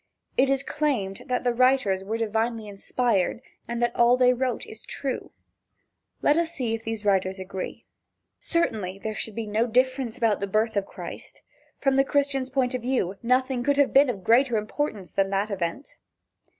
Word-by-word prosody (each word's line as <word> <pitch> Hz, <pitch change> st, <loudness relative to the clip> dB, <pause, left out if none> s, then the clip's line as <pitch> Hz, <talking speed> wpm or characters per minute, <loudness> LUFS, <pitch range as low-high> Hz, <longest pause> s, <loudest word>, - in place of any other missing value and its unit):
It 265 Hz, +1 st, +3 dB
is 275 Hz, 0 st, +1 dB
claimed 265 Hz, -12 st, -2 dB
that 250 Hz, 0 st, -1 dB
the 245 Hz, -1 st, +2 dB
writers 250 Hz, -6 st, +3 dB
were 220 Hz, +3 st, -2 dB
divinely 225 Hz, 0 st, -1 dB
inspired, 205 Hz, 0 st, 0 dB, 0.3 s
and 235 Hz, 0 st, -2 dB
that 240 Hz, 0 st, 0 dB
all 240 Hz, +1 st, +5 dB
they 250 Hz, 0 st, +5 dB
wrote 250 Hz, -1 st, -2 dB
is 220 Hz, -, -9 dB
true. 270 Hz, -2 st, -4 dB, 0.9 s
Let 295 Hz, -, +4 dB
us 335 Hz, 0 st, 0 dB
see 245 Hz, -6 st, -1 dB
if 225 Hz, 0 st, -4 dB
these 225 Hz, -2 st, -4 dB
writers 190 Hz, -1 st, +2 dB
agree. 185 Hz, 0 st, -6 dB, 0.5 s
Certainly 210 Hz, -, -1 dB
there 220 Hz, -, -2 dB
should 215 Hz, -1 st, -5 dB
be 230 Hz, -, -3 dB
no 215 Hz, +3 st, +1 dB
difference 255 Hz, 0 st, +1 dB
about 225 Hz, -4 st, +2 dB
the 200 Hz, -, -2 dB
birth 215 Hz, +3 st, +1 dB
of 200 Hz, -1 st, 0 dB
Christ. -, -, -9 dB, 0.3 s
From 270 Hz, -1 st, +1 dB
the 270 Hz, -, +6 dB
Christian's 275 Hz, -2 st, 0 dB
point 260 Hz, -2 st, 0 dB
of 250 Hz, -, -2 dB
view, 235 Hz, -7 st, -1 dB
nothing 255 Hz, +1 st, +1 dB
could 285 Hz, +2 st, +2 dB
have 285 Hz, -1 st, +3 dB
been 275 Hz, 0 st, +6 dB
of 200 Hz, -6 st, -4 dB
greater 240 Hz, +3 st, +4 dB
importance 215 Hz, -, -3 dB
than 195 Hz, 0 st, +1 dB
that 200 Hz, +2 st, -1 dB
event. 185 Hz, -, -4 dB
235 Hz, 180 wpm, -26 LUFS, 210-260 Hz, 0.9 s, the